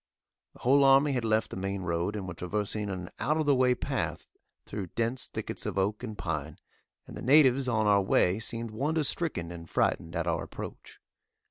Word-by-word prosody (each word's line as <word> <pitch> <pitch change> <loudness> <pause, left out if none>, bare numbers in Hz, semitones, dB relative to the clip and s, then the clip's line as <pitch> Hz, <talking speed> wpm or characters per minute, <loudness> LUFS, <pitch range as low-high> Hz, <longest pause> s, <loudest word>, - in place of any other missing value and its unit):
The - - -18
whole 140 +3 +5
army 135 +2 +6
had 125 -3 -1
left 110 0 +1
the - - -5
main 95 0 -3
road 85 +4 -1
and 100 -3 -4
were 90 - -5
traversing 105 +4 -3
an 90 -2 -5
out 155 +2 +1
of 155 - 0
the 145 - +4
way 130 -1 +3
path - - -3 0.4
through 100 -3 -5
dense 115 +7 -2
thickets - - -5
of - - -3
oak 100 +2 0
and 110 -4 -6
pine, 80 -4 -4 0.5
and - - -10
the - - -7
natives 135 -1 +5
on 110 -3 +1
our 100 -1 +5
way 95 0 +2
seemed 115 0 -4
wonder 150 +8 0
stricken 135 - -2
and 85 -1 -9
frightened 85 +1 0
at 85 -1 -1
our 85 -1 0
approach. - - -9
105 Hz, 200 wpm, -29 LUFS, 90-130 Hz, 0.5 s, army